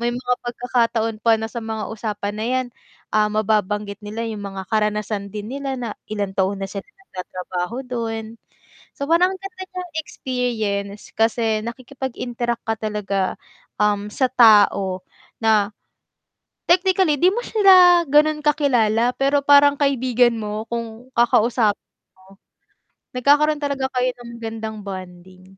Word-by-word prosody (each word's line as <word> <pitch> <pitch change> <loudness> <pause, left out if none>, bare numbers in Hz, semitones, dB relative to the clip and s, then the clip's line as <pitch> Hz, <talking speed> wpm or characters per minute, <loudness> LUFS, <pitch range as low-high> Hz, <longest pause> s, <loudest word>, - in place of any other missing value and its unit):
may 240 0 0
mga 250 0 0
pagkakataon 235 -2 -1
pa 230 -1 +5
na 220 - -3
sa 240 - -4
mga 220 -1 -4
usapan 210 -2 -4
na 215 - -2
'yan, 255 0 0 0.5
ah, 215 0 +4
mababanggit 210 -1 0
nila 215 +2 -4
yung 215 -2 -5
mga 190 -1 -6
karanasan 210 -1 -1
din 210 +2 -6
nila 275 0 -3
na 235 -3 -4 0.2
ilang 205 -2 -2
taon 190 +1 0
na - - -1
silang 205 - -8 0.2
nagtatrabaho 185 +5 -5
dun. 225 -2 -4 0.5
So, 280 - -5
parang 350 +3 +4
ang 380 - -9
ganda 385 -1 -8
niyang 360 -2 -7
experience 220 -8 -3
kasi 225 -1 +1
nakikipag-interact 240 -1 -4
ka 225 - +2
talaga, 205 -3 -2 0.4
um, 210 0 +1
sa 260 +2 +1
tao 205 -6 +5 0.4
na 215 -2 +3 1.0
technically 370 -2 +3
'di 360 - +6
mo 475 - -2
sila 365 -5 +6
ganun 300 +1 +4
kakilala, 245 -6 +2
pero 275 +1 +2
parang 285 0 +6
kaibigan 255 -4 +2
mo 215 0 -4
kung 235 +1 -6
kakausapin 235 -2 +2 0.4
mo. 190 +1 -20 0.8
Nagkakaroon 295 +3 +3
talaga 280 -2 -1
kayo 250 0 +1
ng 240 -1 -12
magandang 225 -1 -5
bonding. 185 -1 -9
230 Hz, 135 wpm, -21 LUFS, 210-265 Hz, 1.0 s, di